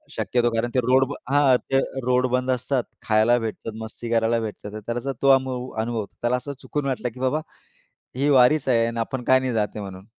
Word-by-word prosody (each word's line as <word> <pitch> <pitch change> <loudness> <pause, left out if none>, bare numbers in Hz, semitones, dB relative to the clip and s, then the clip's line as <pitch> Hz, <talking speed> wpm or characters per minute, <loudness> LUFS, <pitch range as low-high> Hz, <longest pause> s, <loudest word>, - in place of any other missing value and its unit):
शक्यतो 120 -1 +1
कारण 115 +1 0
ते - - +4
रोड 130 +1 +4 0.3
हां, 140 -3 +5 0.2
ते 135 - +4 0.3
रोड 125 0 +2
बंद 130 0 +1
असतात. 125 +1 0 0.2
खायला 110 +2 +3
भेटतात, 115 0 -5
मस्ती 115 +1 -8
करायला 115 0 +2
भेटतात, 105 -1 -6
त्याला 120 +3 -2
तो 140 - +4
अनु 130 -1 -3
अनुभव 115 0 -2
होतो 100 - -6
त्याला 120 +1 +1
असं 140 +3 -6
चुकून 145 -1 -3
वाटलं 125 -2 -2
की 125 - -12
बाबा 130 +4 0 0.7
ही 140 +3 +1
वारीच 135 +1 +4
आहे 115 -2 +3
आणि 115 0 -4
आपण 125 +2 -3
काय 130 0 +5
नाही 130 -2 -2
जाते 105 -1 -1
म्हणून. 95 0 -9
125 Hz, 200 wpm, -23 LUFS, 115-130 Hz, 0.7 s, हां